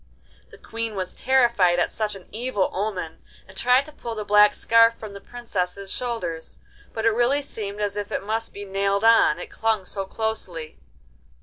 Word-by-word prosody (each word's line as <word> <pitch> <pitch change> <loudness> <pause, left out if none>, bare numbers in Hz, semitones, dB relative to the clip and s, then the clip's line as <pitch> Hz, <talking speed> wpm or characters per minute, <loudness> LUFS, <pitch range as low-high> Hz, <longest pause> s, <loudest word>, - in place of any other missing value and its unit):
The - - -14
Queen 230 -1 -5
was 185 -1 -4
terrified 235 -9 +3
at 175 - +1
such 215 -2 -2
an 190 - -13
evil 220 -3 -1
omen, 185 -5 -3 0.3
and 190 - -15
tried 250 +6 +3
to 305 - -11
pull 235 -6 -7
the 210 -1 -4
black 210 0 +6
scarf 230 0 +5
from 215 -3 -9
the 200 - -9
Princess's 200 -5 -4
shoulders, 180 -10 -4 0.3
but 220 0 -3
it 230 - +5
really 245 +6 +2
seemed 210 -6 -4
as 205 -1 -1
if 205 -1 -4
it - - -2
must 225 +2 -2
be 205 0 -8
nailed 200 +1 0
on, 225 -9 +5
it 175 - -8
clung 220 -4 0
so 195 +1 -4
closely. 190 - -4
210 Hz, 185 wpm, -24 LUFS, 195-230 Hz, 0.3 s, black